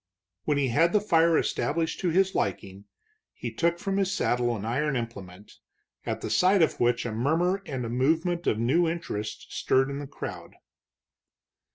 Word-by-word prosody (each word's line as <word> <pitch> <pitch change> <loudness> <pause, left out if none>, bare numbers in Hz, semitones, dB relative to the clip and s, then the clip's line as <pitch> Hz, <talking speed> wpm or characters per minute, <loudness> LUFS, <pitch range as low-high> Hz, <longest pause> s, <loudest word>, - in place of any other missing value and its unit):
When 145 - +1
he 135 -2 +1
had 165 +8 +3
the 210 - +5
fire 170 -5 +3
established 160 +2 -1
to 180 - 0
his 190 +3 +2
liking, 100 +1 -3 0.5
he 120 -2 -6
took 170 +7 +1
from 195 +2 -2
his 195 -1 +1
saddle 120 - 0
an 105 -1 -6
iron 135 +5 0
implement, 100 -5 -7 0.5
at - - -2
the - - -4
sight 185 0 +4
of - - 0
which 120 0 +1
a 115 - -2
murmur 165 - +1
and 130 -4 -3
a - - -4
movement 160 +8 0
of 110 - +2
new 150 +9 +2
interest 110 -11 -5
stirred 135 +1 +2
the 140 0 -5
crowd. 140 - -8
145 Hz, 170 wpm, -27 LUFS, 120-170 Hz, 0.5 s, the